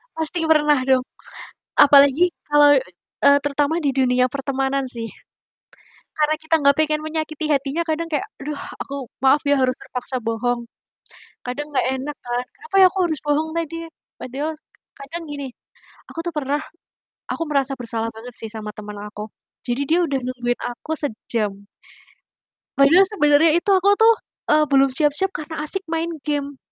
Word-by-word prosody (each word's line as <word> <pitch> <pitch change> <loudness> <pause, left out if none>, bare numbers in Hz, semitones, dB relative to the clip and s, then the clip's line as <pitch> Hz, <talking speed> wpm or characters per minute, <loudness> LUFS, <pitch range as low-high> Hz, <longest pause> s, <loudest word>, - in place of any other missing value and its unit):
Pasti 320 +1 0
pernah 300 -2 +4
dong, 260 -1 +3 0.8
apalagi 285 +3 +7 0.2
kalau, 295 0 +6 0.5
eee, 280 0 +6
terutama 290 +3 0
di 285 -5 -1
dunia 250 -1 +3
pertemanan 270 +1 -2
sih. 230 -2 -4 1.1
Karena 305 0 +1
kita 315 +1 -1
nggak 280 0 +5
pengen 305 -1 +1
menyakiti 310 0 -3
hatinya 280 +3 0
kadang 330 0 -2
kayak, 335 +6 -3
"Aduh, 295 +2 -5 0.2
aku 275 -3 -6
maaf 270 +2 +3
ya 285 -1 +2
harus 255 -1 +2
terpaksa 250 0 -4
bohong." 235 +1 -2 0.7
Kadang 290 +4 -5
nggak - - +2
enak 295 +3 -5
kan, 245 +1 -3
"Kenapa 455 -3 -5
ya - - +10
aku 385 - -6
harus 310 - 0
bohong 300 +2 +1
tadi 330 0 -4
ya?" - - -23 0.3
Padahal 280 +5 -3 0.5
kadang 320 +5 -7
gini, 285 -2 -5 0.6
aku - - -12
tuh - - -4
pernah 290 0 -1 0.7
aku - - -3
merasa 275 -2 +1
bersalah 230 -2 -2
banget 235 +2 -8
sih, 225 -2 -2
sama 215 -1 -6
temen 210 0 -9
aku. 210 +1 -8 0.4
Jadi 245 +2 -1
dia 330 +5 +2
udah 285 -5 0
nungguin 245 -1 -2 0.2
aku 310 - -7
sejam, 220 -5 -2 1.3
padahal 310 +8 +6
sebenarnya 295 -4 +4
itu 345 - -2
aku 380 +1 +4
tuh, 450 +1 +6 0.4
eee, 305 0 +4
belum 275 -1 +4
siap-siap 300 +7 +3
karena 310 0 -5
asik 380 +6 -1
main 330 +1 -1
game 285 -2 -3
285 Hz, 155 wpm, -21 LUFS, 255-315 Hz, 1.3 s, ya